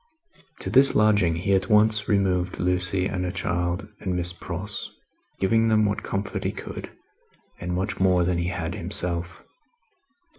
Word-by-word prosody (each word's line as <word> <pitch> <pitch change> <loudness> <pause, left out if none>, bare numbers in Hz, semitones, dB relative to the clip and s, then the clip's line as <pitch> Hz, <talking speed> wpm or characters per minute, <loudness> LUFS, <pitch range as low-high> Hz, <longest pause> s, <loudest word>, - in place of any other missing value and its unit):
To - - -3
this 135 +1 +6
lodging 105 -6 +3
he 95 +4 0
at 95 +3 +1
once 110 0 +3
removed 95 -3 +1
Lucie 90 +1 0
and 95 -1 -2
her 90 - -1
child, 90 +2 -2
and 95 -2 -2
Miss 90 0 -1
Pross: 95 +3 -6 0.5
giving 115 +4 +3
them 110 -1 +3
what 100 0 -1
comfort 100 +1 -3
he - - 0
could, - - -7 0.7
and 90 0 -4
much 95 +3 -2
more 90 -2 +3
than 85 0 0
he 85 - -1
had 90 -3 -3
himself. 85 -1 -3
95 Hz, 155 wpm, -25 LUFS, 90-105 Hz, 0.7 s, this